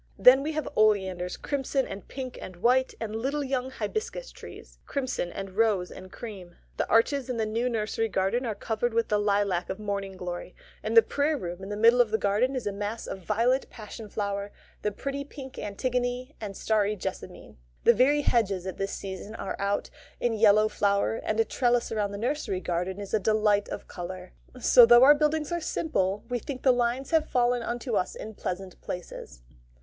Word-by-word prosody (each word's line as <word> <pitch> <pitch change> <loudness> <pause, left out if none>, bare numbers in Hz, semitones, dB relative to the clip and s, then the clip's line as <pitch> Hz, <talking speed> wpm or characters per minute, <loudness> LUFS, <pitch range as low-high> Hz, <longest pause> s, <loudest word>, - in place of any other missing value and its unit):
Then 260 +2 +8
we 310 +3 -2
have 310 0 -2
oleanders, 190 -4 +2
crimson 275 -1 -1
and 195 - -8
pink 255 -2 -6
and 185 - -8
white, 250 +8 +2
and 220 -1 -4
little 275 +6 -1
young 260 -1 -1
hibiscus 435 - -4
trees, - - -12
crimson 260 -10 -2
and 195 -1 -6
rose 200 -3 +1
and 185 0 -11
cream. 190 -7 -9 0.2
The - - -1
arches 265 +4 +3
in 250 - -2
the 220 - +1
new 230 +3 0
nursery 225 0 -1
garden 195 +6 0
are 225 -4 -2
covered 225 +2 -2
with 230 0 +1
the 210 -1 +2
lilac 200 -3 +1
of 190 - -3
morning 200 -2 -4
glory; 180 0 -6 0.3
and 225 +2 0
the 230 - +10
Prayer 290 +6 0
room 175 -5 -6
in 190 - -7
the 205 - -3
middle 230 +3 +6
of 235 - +2
the 220 - +1
garden 220 +7 +1
is 255 - -3
a 205 - 0
mass 205 +3 -4
of - - -6
violet 235 +7 +1
passion 215 -1 -9
flower, 200 -1 -3 0.3
the 210 - 0
pretty 275 +6 -4
pink 270 -2 -10
antigone, 250 +5 -2
and 200 -3 -6
starry 215 -1 +1
jessamine. 185 - -7 0.3
The 235 - +7
very 270 +6 +4
hedges 200 -8 +1
at 190 - -5
this 195 0 -2
season 195 +2 -6
are 195 - -4
out 200 +1 -1 0.3
in 240 -1 +1
yellow 215 -1 +5
flower, 200 +1 +1
and 215 +1 -2
a 225 - +4
trellis 245 -1 +1
round 210 -2 -1
the 200 - -5
nursery 235 -4 -1
kitchen 180 +2 -2
is 200 -1 -7
a 220 - +4
delight 210 0 +2
of - - -6
colour; 180 0 -7 0.3
so 245 0 +7
though 240 +1 +8
our 285 +2 +9
buildings 300 +1 0
are 345 0 -1
simple, 205 - -1
we 245 0 -1
think 255 +3 -7
the 260 - +6
lines 245 +3 -1
have 320 -1 +2
fallen 245 0 +2
unto 240 +1 -3
us 185 - 0
in 220 - -7
pleasant 185 -2 -5
places. 170 - -7
220 Hz, 195 wpm, -27 LUFS, 200-250 Hz, 0.3 s, the